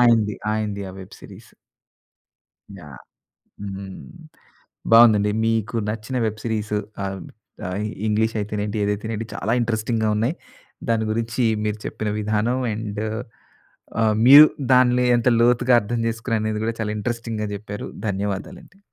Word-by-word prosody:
ఆయనది. 115 Hz, -4 st, +4 dB, 0.2 s
ఆయనది. 105 Hz, -2 st, -2 dB
ఆ -, -, -11 dB
వెబ్ 95 Hz, -, -12 dB
సీరీస్. -, -, -14 dB, 1.3 s
యాహ్! 75 Hz, -8 st, -12 dB, 0.6 s
హ్మ్. 95 Hz, -1 st, -7 dB, 0.8 s
బాగుందండి. 110 Hz, -3 st, +7 dB, 0.2 s
మీకు 115 Hz, 0 st, 0 dB
నచ్చిన 110 Hz, +4 st, -4 dB
వెబ్ 110 Hz, 0 st, -3 dB
సిరీసు. 105 Hz, -2 st, -2 dB, 0.3 s
ఆహ్, 95 Hz, -1 st, -4 dB, 0.5 s
ఆహ్, 90 Hz, -, -4 dB, 0.3 s
ఇంగ్లీష్ 110 Hz, +2 st, +1 dB
అయితేనేంటి, 105 Hz, 0 st, -3 dB
ఏదైతే 105 Hz, +1 st, -2 dB
ఏంటి. 110 Hz, +2 st, -5 dB
చాలా 110 Hz, -, -2 dB
ఇంట్రెస్టింగ్‌గా 110 Hz, -1 st, 0 dB
ఉన్నాయి. 115 Hz, +9 st, 0 dB, 0.6 s
దాని 110 Hz, -1 st, +1 dB
గురించి 115 Hz, +3 st, -1 dB, 0.2 s
మీరు 105 Hz, 0 st, -2 dB
చెప్పిన 110 Hz, -, -4 dB
విధానం. 110 Hz, +4 st, 0 dB
అండు, 105 Hz, 0 st, -4 dB, 1.0 s
ఆహ్, 110 Hz, -1 st, +3 dB
మీరు 145 Hz, +4 st, +11 dB, 0.3 s
దాన్లో 125 Hz, 0 st, +4 dB
ఎంత 120 Hz, +1 st, +1 dB
లోతుగా 125 Hz, +1 st, +4 dB
అర్థం 115 Hz, +3 st, -3 dB
చేసుకునారు 115 Hz, 0 st, -2 dB
అనేది 110 Hz, 0 st, -2 dB
గూడా, 115 Hz, 0 st, -1 dB
చాలా 105 Hz, -1 st, -2 dB
ఇంట్రెస్టింగ్‌గా 115 Hz, -1 st, -3 dB
చెప్పారు. 105 Hz, 0 st, -7 dB, 0.2 s
ధన్యవాదాలండి. 100 Hz, -, -5 dB
110 Hz, 125 wpm, -22 LUFS, 105-115 Hz, 1.3 s, మీరు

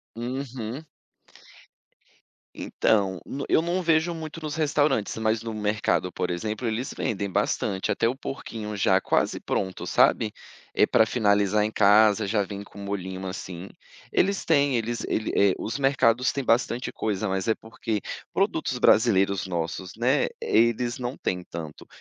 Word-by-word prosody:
Uhum. 125 Hz, +1 st, -5 dB, 1.7 s
Então, 95 Hz, -4 st, 0 dB
n 140 Hz, -, -5 dB
eu -, -, +4 dB
não 175 Hz, +3 st, -1 dB
vejo 165 Hz, 0 st, +2 dB
muito 160 Hz, 0 st, -7 dB
nos 155 Hz, -1 st, -4 dB
restaurantes, 145 Hz, -7 st, +1 dB
mas 110 Hz, 0 st, 0 dB
no 115 Hz, -1 st, -5 dB
mercado, 105 Hz, -3 st, 0 dB
por 90 Hz, -, -2 dB
exemplo, 105 Hz, +7 st, -3 dB
eles 115 Hz, +4 st, -2 dB
vendem 100 Hz, -2 st, -2 dB
bastante, 95 Hz, +1 st, -1 dB
até 115 Hz, -, +1 dB
o 125 Hz, -, -2 dB
porquinho 110 Hz, -6 st, -6 dB
já 95 Hz, -1 st, +3 dB
quase -, -, 0 dB
pronto, 95 Hz, -2 st, -3 dB
sabe? -, -, +3 dB, 0.4 s
Eh, -, -, +5 dB
pra 110 Hz, -, +4 dB
finalizar 105 Hz, -2 st, +2 dB
em 105 Hz, -, -1 dB
casa, 105 Hz, 0 st, +5 dB
já 105 Hz, 0 st, +1 dB
vem 100 Hz, +1 st, -7 dB
com 100 Hz, -, -14 dB
um -, -, -7 dB
molhinho, 95 Hz, -1 st, -4 dB
assim. 95 Hz, 0 st, -6 dB, 0.4 s
Eles 195 Hz, +1 st, +1 dB
têm, 140 Hz, -4 st, +3 dB
eles 115 Hz, 0 st, -2 dB
ele 110 Hz, -, -1 dB
eh, 100 Hz, -1 st, +4 dB
os 115 Hz, -, -4 dB
mercados 130 Hz, -2 st, +3 dB
têm 140 Hz, -, -2 dB
bastante 120 Hz, +1 st, +1 dB
coisa, 105 Hz, -1 st, -2 dB
mas 95 Hz, +1 st, -2 dB
é 110 Hz, -, +3 dB
porque 110 Hz, -2 st, -4 dB, 0.3 s
produtos -, -, 0 dB
brasileiros, 100 Hz, -4 st, +3 dB
nossos, 90 Hz, +1 st, -3 dB
né, 120 Hz, +4 st, +2 dB
eles 120 Hz, -, +2 dB
não 125 Hz, +1 st, -3 dB
têm 90 Hz, -1 st, -2 dB
tanto. 80 Hz, -3 st, -8 dB
110 Hz, 155 wpm, -25 LUFS, 100-125 Hz, 1.7 s, Eh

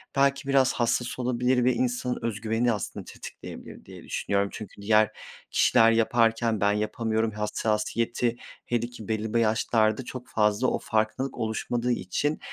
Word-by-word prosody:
belki 140 Hz, 0 st, +2 dB
biraz 135 Hz, -2 st, +3 dB
hassas 120 Hz, +1 st, -1 dB
olabilir 125 Hz, 0 st, +1 dB
ve 125 Hz, +1 st, +4 dB
insanın 125 Hz, +1 st, -1 dB
öz 115 Hz, -2 st, -3 dB
güvenini 115 Hz, +2 st, +1 dB
aslında 105 Hz, -, -5 dB
tetikleyebilir -, -, -10 dB
diye -, -, -11 dB
düşünüyorum. 100 Hz, 0 st, -1 dB
Çünkü 105 Hz, -2 st, -9 dB
diğer 110 Hz, +1 st, +4 dB, 0.4 s
kişiler 115 Hz, 0 st, +5 dB
yaparken, 115 Hz, -1 st, +2 dB
"Ben 100 Hz, 0 st, +4 dB
yapamıyorum." 110 Hz, +1 st, -1 dB
hassasiyeti, 110 Hz, +3 st, -1 dB, 0.3 s
hele 120 Hz, -1 st, -1 dB
ki 120 Hz, -4 st, -11 dB
belli 110 Hz, +1 st, -1 dB
yaşlarda 110 Hz, +1 st, +2 dB
çok 125 Hz, 0 st, -8 dB
fazla 105 Hz, +3 st, +2 dB
o -, -, 0 dB
farklılık 110 Hz, +5 st, -1 dB
oluşmadığı 120 Hz, +2 st, -1 dB
için. 145 Hz, +9 st, -1 dB
115 Hz, 140 wpm, -27 LUFS, 110-125 Hz, 0.4 s, kişiler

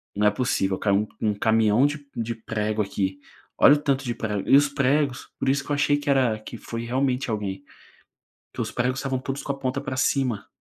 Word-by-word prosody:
"Não 105 Hz, +1 st, +3 dB
é -, -, +5 dB
possível, 100 Hz, -5 st, 0 dB
caiu 105 Hz, +1 st, +1 dB
um 110 Hz, -, +2 dB
um -, -, +1 dB
caminhão 110 Hz, +4 st, +3 dB
de 145 Hz, 0 st, -2 dB
de 115 Hz, 0 st, -3 dB
prego 110 Hz, -1 st, -2 dB
aqui, 95 Hz, -1 st, -2 dB, 0.4 s
olha 145 Hz, -, +8 dB
o -, -, 0 dB
tanto 140 Hz, -2 st, 0 dB
de 120 Hz, -2 st, -2 dB
prego.", 105 Hz, -4 st, -3 dB
e -, -, +7 dB
os 145 Hz, 0 st, +4 dB
pregos 140 Hz, -1 st, 0 dB
por -, -, -2 dB
isso 140 Hz, +1 st, +2 dB
que 145 Hz, -, -8 dB
eu -, -, +3 dB
achei 145 Hz, 0 st, +2 dB
que 145 Hz, 0 st, -4 dB
era, 130 Hz, -5 st, +3 dB
que 115 Hz, +2 st, -9 dB
foi 115 Hz, +1 st, -6 dB
realmente 130 Hz, +1 st, 0 dB
alguém, 100 Hz, -3 st, -3 dB, 0.9 s
que -, -, -6 dB
os -, -, -2 dB
pregos 125 Hz, +2 st, -1 dB
estavam 135 Hz, -2 st, -1 dB
todos 135 Hz, +1 st, -4 dB
com -, -, -8 dB
a 135 Hz, -, -9 dB
ponta 130 Hz, 0 st, -2 dB
para 130 Hz, -2 st, -5 dB
cima. 130 Hz, -7 st, 0 dB
125 Hz, 225 wpm, -24 LUFS, 105-140 Hz, 0.9 s, olha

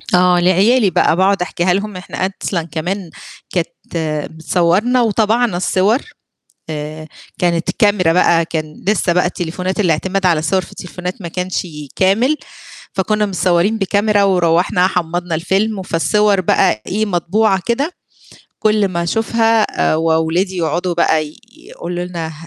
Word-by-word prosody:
آه، 180 Hz, 0 st, +4 dB
لعيالي 195 Hz, +6 st, +3 dB
بقى، 165 Hz, -, +2 dB
باقعد 190 Hz, +1 st, +2 dB
أحكيها 180 Hz, 0 st, 0 dB
لهم 200 Hz, +1 st, -3 dB
إحنا 185 Hz, 0 st, -4 dB
أصلًا 190 Hz, -2 st, -3 dB
كمان 180 Hz, +3 st, -3 dB, 0.4 s
كانت 175 Hz, -2 st, -1 dB, 0.6 s
بتصوّرنا 180 Hz, +9 st, +1 dB
وطَبَعنا 225 Hz, -1 st, +1 dB
الصور 190 Hz, +6 st, +2 dB, 0.7 s
آآ، 155 Hz, +1 st, -6 dB, 0.3 s
كانت 170 Hz, -1 st, 0 dB
كاميرا 205 Hz, -7 st, +3 dB
بقى، 170 Hz, -1 st, +3 dB
كان 155 Hz, -2 st, -6 dB
لسه 200 Hz, -4 st, +2 dB
بقى 180 Hz, +1 st, +2 dB
التليفونات 180 Hz, +3 st, -3 dB
الاعتماد 190 Hz, +2 st, 0 dB
على 170 Hz, -3 st, +3 dB
الصور 160 Hz, +5 st, +1 dB
في -, -, -12 dB
التليفونات 180 Hz, +2 st, -7 dB
ما 170 Hz, -, -5 dB
كانش 180 Hz, +2 st, -3 dB, 0.3 s
كامل، 225 Hz, +10 st, +2 dB, 0.6 s
فكنا 210 Hz, +2 st, 0 dB
متصوّرين 185 Hz, +3 st, +1 dB
بكاميرا، 205 Hz, +1 st, +2 dB
وروّحنا 180 Hz, 0 st, +2 dB
حمّضنا 175 Hz, -1 st, -2 dB
الفيلم، 195 Hz, +6 st, 0 dB
وفالصور 195 Hz, +3 st, +1 dB
بقى 110 Hz, -10 st, +2 dB
إيه، 215 Hz, +3 st, -1 dB
مطبوعة 195 Hz, +2 st, +1 dB
كده 275 Hz, +8 st, 0 dB, 0.7 s
كُلّ 215 Hz, -2 st, +2 dB
ما 170 Hz, -2 st, -2 dB
أشوفها 225 Hz, +4 st, +2 dB, 0.3 s
آآ، -, -, +2 dB
وولادي 165 Hz, +4 st, 0 dB
يقعدوا 175 Hz, +1 st, -1 dB
بقى 160 Hz, -2 st, +2 dB
ي 150 Hz, -, -15 dB, 0.2 s
يقولوا 175 Hz, +1 st, -6 dB
لنا 170 Hz, -3 st, -5 dB
ه 160 Hz, -, -8 dB
185 Hz, 135 wpm, -17 LUFS, 170-205 Hz, 0.7 s, آه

